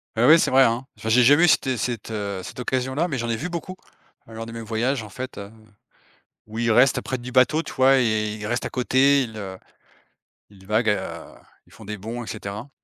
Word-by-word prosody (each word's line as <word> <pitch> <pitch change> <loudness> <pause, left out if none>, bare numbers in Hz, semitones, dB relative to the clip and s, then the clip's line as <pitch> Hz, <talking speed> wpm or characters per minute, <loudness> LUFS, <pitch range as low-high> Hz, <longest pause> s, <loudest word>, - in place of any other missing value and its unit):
Ah 115 +2 +3
ouais, 160 +2 +9
c'est - - +1
vrai 135 +1 +6
hein. 120 +2 +1
Enfin 110 - -5
j'ai 125 +3 +5
jamais 145 +7 +6
eu - - +3
cette 155 - +3
é 130 - 0
cette, 115 -1 -4
heu, 100 -3 -4
cette - - -9
occasion-là, 130 +6 -1
mais 145 -6 -3
j'en 120 -1 -3
ai 115 - 0
vu 160 +10 -5
beaucoup 175 +2 -6 0.5
lors 115 0 -7
de 115 - -9
mes 115 0 -7
voyages 115 +4 -1
en 105 - -10
fait, 130 +4 -7
heu, 100 +1 -9 1.0
où 110 +1 -8
ils 115 0 +1
restent 125 +4 +4
près 130 - -3
du 125 0 -9
bateau, 130 +6 +3
tu - - -9
vois? 130 +1 +4
Et 110 -3 0
ils 105 0 -7
restent 120 +3 -2
à - - -4
côté, 135 +2 +3
ils, 110 -3 -7
heu, 95 -2 -7 0.9
ils 95 -2 -18
vaguent, 110 +3 0
heu, 105 - -4 0.3
ils - - -22
font - - -14
des 105 +1 -6
bonds 115 +5 -6
et - - -11
cetera 105 +4 -7
120 Hz, 240 wpm, -23 LUFS, 110-130 Hz, 1.0 s, ouais